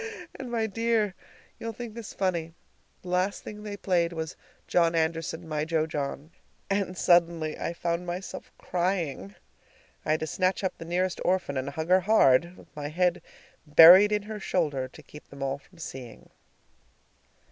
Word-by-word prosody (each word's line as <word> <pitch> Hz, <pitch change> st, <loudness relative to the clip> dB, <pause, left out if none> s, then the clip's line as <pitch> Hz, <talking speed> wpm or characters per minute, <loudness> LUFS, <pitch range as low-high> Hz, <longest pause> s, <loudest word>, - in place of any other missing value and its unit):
And, 260 Hz, -2 st, -7 dB
my 230 Hz, -2 st, 0 dB
dear 220 Hz, -2 st, 0 dB, 0.5 s
you'll 230 Hz, 0 st, -4 dB
think 235 Hz, 0 st, -7 dB
this 230 Hz, -2 st, -8 dB
funny 170 Hz, -4 st, -2 dB, 0.5 s
the 180 Hz, -, -8 dB
last 180 Hz, +2 st, 0 dB
thing 210 Hz, 0 st, -8 dB
they 205 Hz, -1 st, -6 dB
played 175 Hz, -3 st, +1 dB
was 160 Hz, 0 st, -5 dB, 0.3 s
"John 170 Hz, -1 st, +2 dB
Anderson, 165 Hz, +1 st, -1 dB
my 150 Hz, -1 st, -1 dB
jo 160 Hz, -1 st, 0 dB
John," 150 Hz, 0 st, -4 dB, 0.4 s
and 195 Hz, -2 st, -1 dB
suddenly 170 Hz, -3 st, +3 dB
I 170 Hz, -, -2 dB
found 170 Hz, +1 st, -2 dB
myself 180 Hz, +2 st, -6 dB
crying! 170 Hz, -, -2 dB, 0.7 s
I -, -, -6 dB
had 155 Hz, 0 st, +2 dB
to -, -, 0 dB
snatch 185 Hz, +4 st, 0 dB
up 190 Hz, -, -1 dB
the 165 Hz, -, -7 dB
nearest 180 Hz, +2 st, -1 dB
orphan 180 Hz, -6 st, 0 dB
and 130 Hz, +1 st, -2 dB
hug 160 Hz, +4 st, -5 dB
her 185 Hz, +1 st, +6 dB
hard, 175 Hz, -4 st, +4 dB
with 150 Hz, -, -18 dB
my 145 Hz, -1 st, -4 dB
head 180 Hz, +3 st, +1 dB, 0.5 s
buried 175 Hz, +7 st, +9 dB
in 210 Hz, -1 st, +1 dB
her 215 Hz, 0 st, -6 dB
shoulder, 145 Hz, -9 st, -1 dB
to 130 Hz, -, -15 dB
keep 150 Hz, -, -14 dB
them 140 Hz, -1 st, -7 dB
all 135 Hz, +1 st, -2 dB
from 175 Hz, +5 st, -23 dB
seeing. 130 Hz, -8 st, -9 dB
170 Hz, 170 wpm, -27 LUFS, 155-190 Hz, 0.7 s, buried